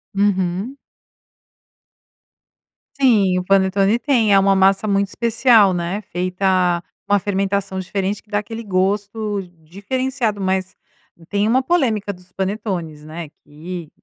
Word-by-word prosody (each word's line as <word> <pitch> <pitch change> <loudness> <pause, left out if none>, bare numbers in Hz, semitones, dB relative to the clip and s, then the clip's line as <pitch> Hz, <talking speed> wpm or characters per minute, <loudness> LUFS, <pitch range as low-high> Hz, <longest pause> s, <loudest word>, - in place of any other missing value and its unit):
Uhum. 195 +4 0 2.2
Sim. 210 -9 +3
O - - -4
panetone 195 +3 +3
tem 235 -8 +2
é 195 - +7
uma 195 0 +3
massa 195 +2 +3
muito 200 0 +1
especial 230 -3 +3
né, 175 +4 -2
feita 180 -1 +1 0.2
com 205 - +1
a 205 - +5
fermentação 195 0 -1
diferente 195 +2 -3
que 210 - -33
dá 205 -1 0
aquele 225 +2 -7
gosto 205 +2 -1 0.2
diferenciado. 215 - -2
Mas 190 0 -1 0.5
tem 205 +1 +1
uma 260 +3 +2
polêmica 230 - +1
dos 180 0 -19
panetones 190 -6 -4
né, 160 0 -7
que 160 +2 -8
195 Hz, 125 wpm, -20 LUFS, 185-215 Hz, 2.2 s, é